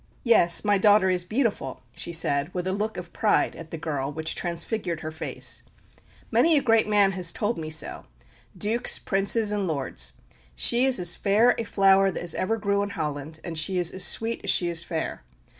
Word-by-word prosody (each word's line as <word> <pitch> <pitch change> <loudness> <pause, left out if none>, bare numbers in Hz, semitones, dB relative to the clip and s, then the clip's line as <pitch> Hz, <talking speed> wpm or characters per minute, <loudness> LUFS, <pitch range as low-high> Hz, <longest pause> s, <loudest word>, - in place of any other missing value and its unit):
"Yes, 175 -7 +4
my 205 -1 +3
daughter 205 -2 +4
is 180 -1 -1
beautiful," 215 - -2
she - - 0
said, 145 -2 +1
with 180 0 -3
a 185 - -1
look 215 +2 -3
of 175 -1 -8
pride 215 - +1
at 165 -1 -10
the 165 - -6
girl 145 -3 -3
which 160 +1 -3
transfigured 175 0 -3
her 155 - -5
face. 160 - -3 0.7
"Many 325 -2 +4
a - - +2
great 225 -2 +3
man 205 -2 +4
has 180 -3 -3
told 215 +3 -2
me 155 -1 -5
so 155 0 -1 0.5
dukes, 230 +4 +1
princes, 205 +2 0
and 205 -2 -1
lords. 140 -5 -3 0.4
She 240 - +4
is 265 -2 +2
as 175 -1 +2
fair 215 +5 +3
a 230 - -3
flower 195 -1 +4
as 175 -2 0
ever 225 +4 -1
grew 200 -1 0
in 200 - -3
Holland; 155 -3 -5
and 165 -2 -3
she 180 +4 0
is 175 -1 0
as 190 - -1
sweet 225 +4 0
as 200 - -3
she 175 -2 +3
is 170 -1 0
fair. 160 - -4
190 Hz, 195 wpm, -25 LUFS, 165-210 Hz, 0.7 s, Yes